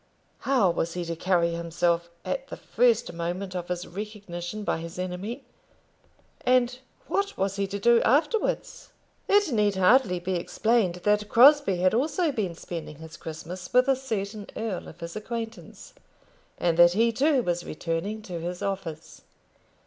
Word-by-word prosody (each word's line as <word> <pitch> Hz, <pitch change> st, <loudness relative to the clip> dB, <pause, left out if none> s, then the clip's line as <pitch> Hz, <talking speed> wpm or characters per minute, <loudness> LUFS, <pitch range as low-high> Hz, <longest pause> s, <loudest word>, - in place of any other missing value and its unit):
How 250 Hz, -10 st, +3 dB
was 170 Hz, 0 st, -2 dB
he 175 Hz, -1 st, -3 dB
to 165 Hz, 0 st, -3 dB
carry 170 Hz, 0 st, +1 dB
himself 170 Hz, 0 st, 0 dB, 0.2 s
at -, -, -3 dB
the -, -, -8 dB
first 235 Hz, -5 st, +1 dB
moment 175 Hz, +3 st, -4 dB
of 175 Hz, -1 st, -4 dB
his 180 Hz, 0 st, -3 dB
recognition 205 Hz, -1 st, -6 dB
by 185 Hz, -, -1 dB
his 165 Hz, +1 st, -8 dB
enemy, 185 Hz, +8 st, -4 dB, 1.0 s
and 250 Hz, 0 st, +2 dB, 0.3 s
what 400 Hz, 0 st, -1 dB
was 195 Hz, +1 st, -1 dB
he 200 Hz, 0 st, 0 dB
to 200 Hz, +1 st, -4 dB
do 235 Hz, +3 st, +4 dB
afterwards? 300 Hz, -, 0 dB, 0.4 s
It 405 Hz, -5 st, +4 dB
need 210 Hz, -2 st, +2 dB
hardly 190 Hz, 0 st, +4 dB
be 185 Hz, +2 st, -3 dB
explained 205 Hz, +2 st, +1 dB
that 210 Hz, 0 st, +2 dB
Crosbie 275 Hz, -4 st, +6 dB
had 185 Hz, +2 st, +3 dB
also 295 Hz, +7 st, +1 dB
been 200 Hz, -10 st, -2 dB
spending 165 Hz, -2 st, -7 dB
his 160 Hz, 0 st, -11 dB
Christmas 165 Hz, +3 st, -8 dB
with 250 Hz, +1 st, +4 dB
a 270 Hz, -, +4 dB
certain 215 Hz, -5 st, -4 dB
earl 220 Hz, -5 st, -3 dB
of 170 Hz, -, -13 dB
his 170 Hz, 0 st, -6 dB
acquaintance, 225 Hz, -4 st, -7 dB, 0.6 s
and 170 Hz, -2 st, +1 dB
that 175 Hz, 0 st, +8 dB
he 230 Hz, +4 st, +3 dB
too 270 Hz, +2 st, +2 dB
was 175 Hz, -2 st, -1 dB
returning 175 Hz, +7 st, -4 dB
to 180 Hz, -4 st, -6 dB
his 175 Hz, +2 st, -5 dB
office. 165 Hz, -5 st, -5 dB
195 Hz, 155 wpm, -26 LUFS, 175-235 Hz, 1.0 s, that